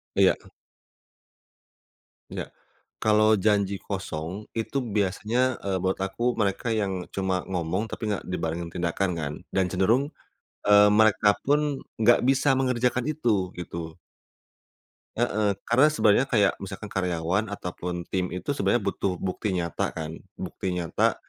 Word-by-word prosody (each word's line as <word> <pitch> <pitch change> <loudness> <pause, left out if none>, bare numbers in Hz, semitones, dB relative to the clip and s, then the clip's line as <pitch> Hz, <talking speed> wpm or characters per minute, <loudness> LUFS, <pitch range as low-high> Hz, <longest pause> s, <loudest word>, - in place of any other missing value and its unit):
Iya. - - +5 1.9
Enggak, - - -5 0.5
kalau 110 0 +4 0.2
janji 100 -2 +2
kosong, 95 0 -5
itu 115 +5 -2 0.2
biasanya, 110 +6 +1
eee, 95 -1 0
buat 95 0 +1
aku 95 +5 -3 0.2
mereka 100 +3 -1
yang 95 -4 -1
cuma 95 -1 -1
ngomong 90 +3 -1
tapi 110 -2 -4
nggak 100 - -2
dibarengin 85 -1 -3
tindakan 90 +2 0
kan, 75 -1 -3 0.2
dan 95 -1 +2
cenderung, 115 +10 +2 0.6
eee, 105 0 +8
mereka 110 -1 +5
pun 145 -1 +1 0.2
nggak 115 +2 +5
bisa 135 +1 +4
mengerjakan 125 -1 +1
itu, 105 -11 0
gitu. 85 -1 -6 1.2
Heeh, 110 -4 +1
karena 130 +6 +5
sebenarnya 130 -5 +3
kayak 105 -6 +3
misalkan 100 +2 -7
karyawan 90 +3 0
ataupun 90 -3 -5
tim 90 -1 0
itu, 90 - -3
sebenarnya - - +1
butuh 95 -2 -1
bukti 95 +2 -2
nyata 85 -2 -2
kan, 80 -1 -4 0.2
bukti 90 -1 -4
nyata, 85 -3 +1
100 Hz, 125 wpm, -26 LUFS, 90-110 Hz, 1.9 s, eee